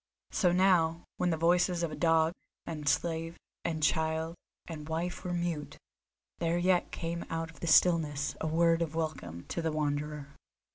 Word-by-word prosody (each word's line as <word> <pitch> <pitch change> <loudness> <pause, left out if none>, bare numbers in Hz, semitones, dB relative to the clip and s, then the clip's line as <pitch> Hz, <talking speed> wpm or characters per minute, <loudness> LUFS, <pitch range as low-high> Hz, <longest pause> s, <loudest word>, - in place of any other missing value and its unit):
So 180 - +3
now, 175 -2 +3
when 180 - +1
the 165 - 0
voices 175 +1 +2
of 155 -2 -3
dog, 165 0 +3 0.3
and 150 -3 -2
slave, 165 0 -1 0.3
and 160 -2 -2
child, 160 +1 +1 0.3
and 155 -2 -7
wife 170 +3 -3
were 180 - -3
mute, 170 -4 -2 0.6
there 170 0 +1
yet 180 0 +2
came 170 0 -3
out 165 0 -3
of 150 - -18
the 170 - -4
stillness 155 -5 +3
a 160 - 0
word 165 +1 +3
of 160 -1 -2
welcome 90 - -4
to 170 - -2
the 165 -1 0
Wanderer. 150 -1 -2
165 Hz, 160 wpm, -31 LUFS, 155-170 Hz, 0.6 s, So